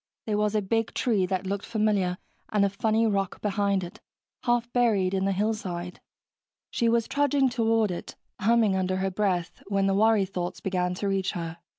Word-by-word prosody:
There 210 -1 0
was 210 0 +1
a 210 - +1
big 225 +3 -1
tree 205 -7 +1
that 185 0 -2
looked 200 +1 -2
familiar, 205 -5 +1 0.3
and 205 -2 +3
a - - +1
funny 220 +3 +1
rock 195 -3 -1
behind 200 -2 0
it, 175 - -9 0.4
half 240 -1 +1
buried 210 -7 +2
in 190 0 0
the 195 - +2
hillside. 185 -4 -2 0.7
She 235 -2 +1
was 230 -1 +2
trudging 285 -1 +2
toward 225 -3 +1
it, 175 - -6 0.2
humming 220 -1 +3
under 185 0 0
her 190 +1 -1
breath, 180 -3 -1
when 195 -1 +1
the 195 - +2
worry 215 0 +4
thoughts 180 -1 -4
began 180 -1 -1
to 200 +2 -3
reach 195 -1 0
her. 170 -2 -5
200 Hz, 185 wpm, -27 LUFS, 185-220 Hz, 0.7 s, worry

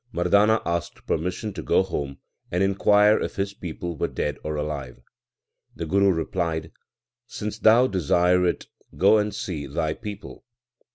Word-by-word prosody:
Mardana 100 +5 +3
asked 85 -1 -3
permission 90 +6 -2
to - - -6
go - - +2
home 70 -7 -4 0.3
and 90 +2 +1
inquire 105 +2 +4
if - - -4
his 100 0 -2
people 85 -2 -6
were - - -1
dead 75 -1 -3
or 75 0 -3
alive. 75 -5 -4 0.8
The 85 - -4
Guru 100 +4 +3
replied, 80 -2 -2 0.6
Since 105 +1 -5
thou 115 +3 +6
desire 90 - +2
it, - - -2 0.3
go 100 +6 +5
and 105 0 -1
see 90 -8 -5
thy 80 +2 -1
people. 105 0 -9
90 Hz, 150 wpm, -24 LUFS, 80-105 Hz, 0.8 s, thou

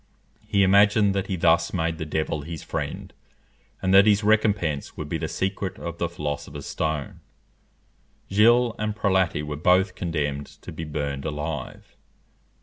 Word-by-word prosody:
He 100 -1 +3
imagined 100 +1 +5
that 100 0 -2
he 95 - -2
thus 85 -1 +2
made 80 -1 -1
the 80 - -4
devil 75 -1 -2
his 80 +1 -7
friend, - - -5 0.7
and 95 0 +2
that 100 +2 +7
his 105 0 +4
recompense 105 -8 +1
would - - -5
be - - -3
the - - -2
secret 95 0 -3
of 85 -1 -6
the 85 - 0
philosopher's 75 -4 -5
stone. 80 -3 -3 1.1
Gilles 115 +4 +4
and 105 0 -2
Prelati 95 -7 +1
were 75 0 -5
both 90 +4 +3
condemned 75 -5 -3 0.2
to - - -8
be 80 +1 -6
burned 70 -2 -3
alive. 75 -2 -5
85 Hz, 150 wpm, -25 LUFS, 75-100 Hz, 1.1 s, that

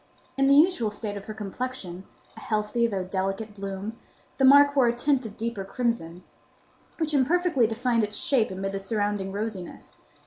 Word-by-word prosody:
In 275 0 +3
the 275 - +6
usual 295 - +4
state 210 0 -4
of 200 -1 -7
her 215 - -6
complexion—a 205 -3 -7
healthy 215 +2 0
though 195 -4 -2
delicate 195 +3 -3
bloom—the 200 +6 -7
mark 285 +2 +7
wore 260 -3 +5
a 235 - +1
tint 260 -1 +1
of 210 - -12
deeper 230 -3 -3
crimson, 190 -5 -3 0.7
which 315 -2 -1
imperfectly 290 -2 +3
defined 230 +1 0
its 210 0 -4
shape 250 -6 +2
amid 190 +1 -4
the 195 - -3
surrounding 205 -1 -2
rosiness. 200 -3 -6
220 Hz, 160 wpm, -26 LUFS, 195-255 Hz, 0.7 s, mark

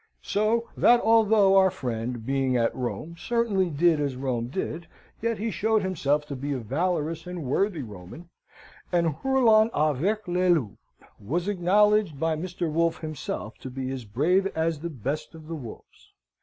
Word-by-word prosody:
So 220 +3 +1
that 240 0 +5
though 220 -3 +5
our 190 0 +6
friend, 120 -7 -4
being 135 -1 +1
at 115 -1 +1
Rome, 140 +6 -4
certainly 215 -5 0
did 160 +1 +3
as 140 -3 -1
Rome 125 -3 -2
did, 170 +3 -4 0.3
yet 230 0 0
he 225 +1 -2
showed 220 0 +1
himself 150 -5 0
to 145 - -6
be 140 +2 -3
a - - -2
valorous 160 - -2
and 180 -2 -5
worthy 160 +4 0
Roman; 105 - -11 0.6
and, 170 -3 +2
hurlant 230 -3 +4
avec 155 +9 0
les 180 +1 +1
loups, 145 - +1 0.4
was 170 - -2
acknowledged 205 -3 +2
by 160 0 +1
Mr. 175 +1 -3
Wolfe 165 +1 +1
himself 155 -8 -5
to 130 - -7
be 130 0 -4
as 130 -2 -5
brave 155 - +1
as 160 -1 0
the 170 +3 -4
best 140 +3 -4
of 155 -1 -12
the 165 - -5
wolves. 125 -8 -11
165 Hz, 165 wpm, -26 LUFS, 135-195 Hz, 0.6 s, our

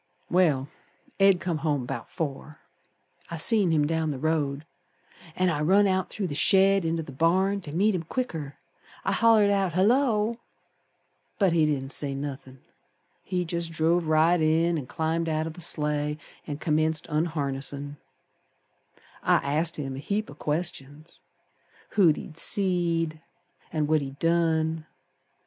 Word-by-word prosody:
Well, 155 -7 +3 0.5
Ed 195 -2 +5
come 170 -4 -2
home 145 -4 -1
'bout 120 -2 -6
four. 150 -1 -5 0.7
I 170 - -5
seen 205 +2 +4
him 155 -2 +2
down 160 0 0
the 145 - -3
road, 150 -1 -1 0.7
An' 185 -1 +2
I 150 -2 -2
run 195 +6 +4
out 190 -1 0
through 205 - -4
the 160 - -4
shed 195 +3 +4
inter 165 0 -1
th' 140 -3 -11
barn 190 +6 +2
To 150 - -8
meet 205 +4 +3
him 180 - -1
quicker. 160 - -4 0.5
I - - +1
hollered 220 -3 +4
out, 195 -4 +1
'Hullo!' 225 +3 +2 1.0
But 195 -5 +3
he 160 -2 +3
didn't 135 -2 -2
say 140 -2 -3
nothin', 135 -2 -7 0.6
He 180 -1 -2
jest 170 0 -3
drove 165 +1 +1
right 160 +2 +3
in 165 +2 +2
An' 130 - -8
climbed 165 +2 -1
out 155 0 -1
o' 160 - -4
th' 175 - -11
sleigh 150 -2 -1 0.3
An' 145 - -4
commenced 155 0 0
unharnessin'. 145 -2 -3 1.2
I - - +3
asked 155 +4 0
him 135 -3 -4
a - - -6
heap 200 +5 -3
o' - - -10
questions; 150 0 -5 0.7
Who 200 -5 +4
he'd 155 +1 -1
seed 170 -5 0 0.5
An' 155 -2 0
what 155 0 +2
he'd 135 0 -7
done. 160 -1 +1
160 Hz, 150 wpm, -26 LUFS, 150-180 Hz, 1.2 s, Ed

